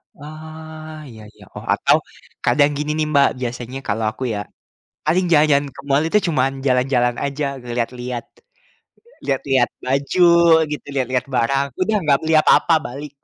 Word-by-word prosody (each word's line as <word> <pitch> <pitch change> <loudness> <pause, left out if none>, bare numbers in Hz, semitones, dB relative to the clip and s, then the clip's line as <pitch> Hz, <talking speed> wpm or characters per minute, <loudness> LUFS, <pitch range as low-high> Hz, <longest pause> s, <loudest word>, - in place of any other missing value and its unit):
Ah, 155 +1 -10
iya 110 -2 -12
iya. - - -18
Oh, - - -8
atau - - +3 0.5
kadang 145 +4 +3
gini 150 +1 -2
nih, 155 - +1
Mbak, 140 -2 +4
biasanya 120 +1 -5
kalau 110 +2 -1
aku 110 - -8
ya, 105 - -3 0.7
paling 175 +5 +2
jalan-jalan 150 -3 +4
ke - - -10
mall 140 +1 +3
itu 210 - +3
cuman 135 -3 +1 0.2
jalan-jalan 125 -1 +2
aja, 140 +1 -2 0.3
lihat-lihat. 125 0 -3 1.0
Lihat-lihat 135 -2 +1
baju 140 +7 -1 0.5
gitu, 150 0 -6
lihat-lihat 130 -1 -1
barang, 135 +3 +1
udah 210 +4 +1
nggak 140 -2 +3
beli 160 0 0
apa-apa, 155 +2 +4
balik. 140 +3 -8
140 Hz, 145 wpm, -20 LUFS, 125-155 Hz, 1.0 s, Mbak